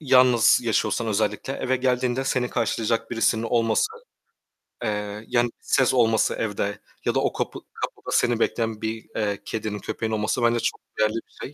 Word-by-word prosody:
Yalnız 125 -5 +5
yaşıyorsan 115 0 0
özellikle, 105 +4 -1
eve 130 -1 0
geldiğinde 125 0 0
seni 125 -2 0
karşılayacak 115 -1 0
birisinin 115 -1 +2
olması, 115 - +2 1.0
eee, 105 -1 -3
yani 120 0 +2
ses 130 - +2
olması 115 -3 +3
evde 105 -2 -2 0.3
ya - - +1
da - - +4
o - - 0
kapı - - -3
kapıda - - -5
seni 120 -2 +2
bekleyen 115 -2 0
bir, 110 0 -3
eee, 105 -2 -1
kedinin, 110 -2 -3
köpeğin 110 +3 -3
olması 110 +3 0
bence 120 0 +3
çok - - -1 0.2
değerli 110 0 +2
bir - - -28
şey 140 - -6
115 Hz, 160 wpm, -24 LUFS, 110-125 Hz, 1.0 s, Yalnız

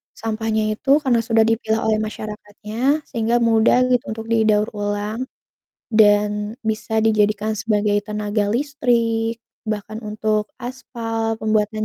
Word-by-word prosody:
sampahnya 220 -1 -1
itu 220 +5 -5
karena 245 -3 +3
sudah 225 -1 +4
dipilah 225 0 0
oleh 215 -1 +2
masyarakatnya 215 +7 -3
sehingga 230 0 0
mudah 225 +1 +4
gitu 245 -1 +3
untuk 225 - -7
didaur 215 -1 +3
ulang, 205 +3 -3 0.6
dan 210 -1 +3
bisa 220 -1 -1
dijadikan 215 0 +1
sebagai 210 -1 +1
tenaga 210 0 -1
listrik, 235 -4 0 0.2
bahkan 215 0 -4
untuk 215 0 -1
aspal, 225 -3 -4
pembuatan 215 0 0
220 Hz, 115 wpm, -21 LUFS, 210-225 Hz, 0.6 s, sudah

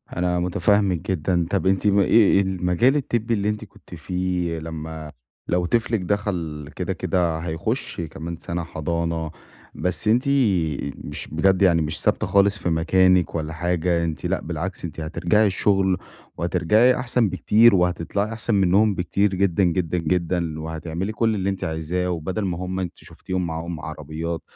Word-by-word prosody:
أنا 90 0 0
متفهمِك 95 +1 +1
جدًا، 85 0 0
طَب 95 -1 0
أنتِ 95 +1 +1
إيه 100 -1 +4
إيه 100 -1 +5
المجال 95 +7 +2
الطبّي 120 -5 -1
اللي 105 -1 0
أنتِ 105 0 -3
كنتِ 95 -2 -14
فيه، 90 -1 -2
لمّا 80 -1 -7 0.4
لو 90 0 +1
طفلك 115 +3 +1
دخل 85 -7 -3
كده، - - -2
كده 85 -3 0
هيخش 80 +1 -3
كمان 80 +1 -6
سنه 85 +1 -4
حضانة، 80 0 -3 0.4
بس 90 0 -2
أنتِ 120 +4 +4 0.8
مش - - -5
بجد 95 +5 +2
يعني 85 -4 +4
مش 75 0 -1
ثابتة - - +1
خالص 100 +1 +3
في 90 - -2
مكانِك 90 +2 +3
والّا 80 -1 -3
حاجة، 85 +1 0
أنتِ 80 -4 -3
لأ - - 0
بالعكس، 85 +2 -4
أنتِ 80 - -7
هترجعي 85 +7 +1
الشغل 95 -1 +2 0.4
وهترجعي 90 +9 +3
أحسن 125 -3 +1
بكتير، 110 +3 +5
وهتطلعي 90 +3 0
أحسن 115 0 -1
منهم 100 +2 +3
بكتير 100 +2 0
جدًا، 95 0 +2
جدًا، 90 -1 0
جدًا، 85 -1 -1
وهتعملي 80 +4 -4
كل 110 0 +1
اللي 95 -1 -1
أنتِ 95 -1 -3
عايزاه، 80 +3 -2
وبدل 90 +5 -3
ما 90 -3 -2
هُم 90 +1 -4
أنتِ 90 -2 -3
شفتيهم 95 -1 -5
معاهم 80 0 -5
عربيات 80 +2 -5
90 Hz, 155 wpm, -23 LUFS, 80-100 Hz, 0.8 s, إيه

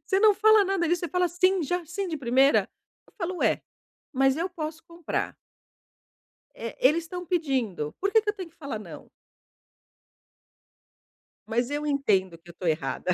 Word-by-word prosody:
Você 385 - +2
não 430 -2 +6
fala 435 0 +5
nada 380 -3 0
disso, 350 +1 +1
você 345 - -3
fala: 360 0 +1
'Sim, 370 +1 +2
já, 355 +4 -2
sim 370 +3 -4
de 320 - -3
primeira'". 265 +1 +3 0.4
Eu - - -24
falo: 360 0 -3
"Ué, - - +1 0.5
mas 270 +1 +3
eu 345 +3 -1
posso 320 -2 -6
comprar" 335 -1 -4 1.2
"eh, 230 0 -7
eles 305 +6 +4
estão 360 +2 -6
pedindo, 260 - -1
por 395 +1 0
que 445 - +5
que 420 - -2
eu 415 - 0
tenho 370 -4 -7
que 330 - -30
falar 280 -9 -5
não?". 210 - -11 2.4
Mas 240 +3 0
eu 295 +1 -2
entendo 200 - +1
que 175 +1 -19
eu - - -10
tô 180 - -7
errada. 165 +3 -1
325 Hz, 175 wpm, -26 LUFS, 260-360 Hz, 2.4 s, não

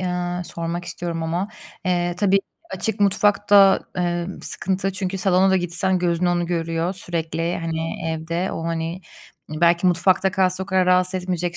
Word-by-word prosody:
ııı, 180 -1 -2
sormak 170 +1 -4
istiyorum 170 -2 -4
ama. 170 +5 -2 0.4
Eee, 175 -1 0
tabii 195 0 +3 0.3
açık 220 -2 -2
mutfak 205 +1 +2
da, 195 -1 +7 0.2
emm, 175 +1 -2
sıkıntı 195 +1 -1
çünkü 190 0 -3
salona 190 0 +3
da 190 - +4
gitsen 180 +1 0
gözün 175 0 0
onu 175 -1 +1
görüyor 165 0 -1
sürekli. 170 -2 -3
Hani 165 -1 -3
evde 165 +3 -2
o 165 - -4
hani, 165 +1 -3 0.5
belki 170 +3 +2
mutfakta 185 +2 +3
kalsa 185 -1 +1
o - - -7
kadar 190 -2 +2
rahatsız 180 0 +3
etmeyecek 175 -1 -2
180 Hz, 155 wpm, -22 LUFS, 170-190 Hz, 0.5 s, da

